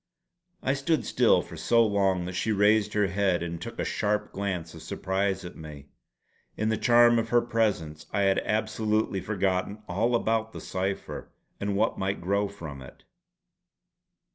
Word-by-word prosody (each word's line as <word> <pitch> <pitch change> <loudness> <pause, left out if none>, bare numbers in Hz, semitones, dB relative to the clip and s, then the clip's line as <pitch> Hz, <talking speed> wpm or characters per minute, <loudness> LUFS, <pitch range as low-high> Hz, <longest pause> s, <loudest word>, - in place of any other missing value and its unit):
I 135 - +2
stood 140 +4 0
still - - +3
for - - -11
so 115 -1 +3
long 95 -4 +1
that 90 - -5
she 100 +5 -1
raised 105 +1 +3
her 105 -1 +3
head 95 -2 +1
and 85 -1 -5
took - - -7
a - - -1
sharp 105 0 -1
glance 95 -5 -3
of 80 - -11
surprise 95 +3 -2
at 90 - -8
me. 75 -3 -10 0.7
In 110 +1 0
the 110 - +1
charm 120 0 +5
of 115 0 -2
her 120 - +5
presence 105 -10 -1
I 100 - 0
had 95 -1 +3
absolutely 110 -2 0
forgotten 100 +1 -1
all 115 +7 +1
about 115 -1 0
the - - -7
cipher 95 +1 -4 0.3
and 100 0 -1
what 110 +3 +1
might 95 +1 -1
grow 100 +4 0
from 80 -9 -9
it. 65 - -13
100 Hz, 165 wpm, -27 LUFS, 90-110 Hz, 0.7 s, charm